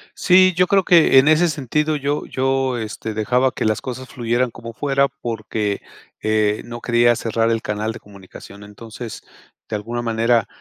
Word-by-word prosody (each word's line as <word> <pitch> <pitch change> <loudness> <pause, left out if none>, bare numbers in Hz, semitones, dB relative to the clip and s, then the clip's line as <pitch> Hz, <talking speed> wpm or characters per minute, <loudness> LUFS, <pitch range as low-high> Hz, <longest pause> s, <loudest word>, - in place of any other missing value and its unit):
Sí, 185 0 +5
yo 180 +1 +3
creo 195 0 +3
que 170 -6 +6
en 135 - +3
ese 160 +3 +4
sentido 150 +1 -1
yo 145 0 -2
yo, 135 -1 -1
este, 110 0 -5
dejaba 125 +5 +1
que - - -4
las 110 0 0
cosas 130 0 -7
fluyeran 120 0 -1
como 115 0 -10
fuera 140 +2 +1
porque, 110 -5 -4 0.4
eh, 110 -1 +1
no 120 0 -8
quería 120 0 +3
cerrar 115 0 -1
el 115 -1 0
canal 105 +1 -3
de - - -10
comunicación. 100 0 -14
Entonces, 110 +2 -9 0.5
de - - -3
alguna 120 +3 -5
manera, 115 -1 +1
120 Hz, 170 wpm, -20 LUFS, 110-135 Hz, 0.5 s, que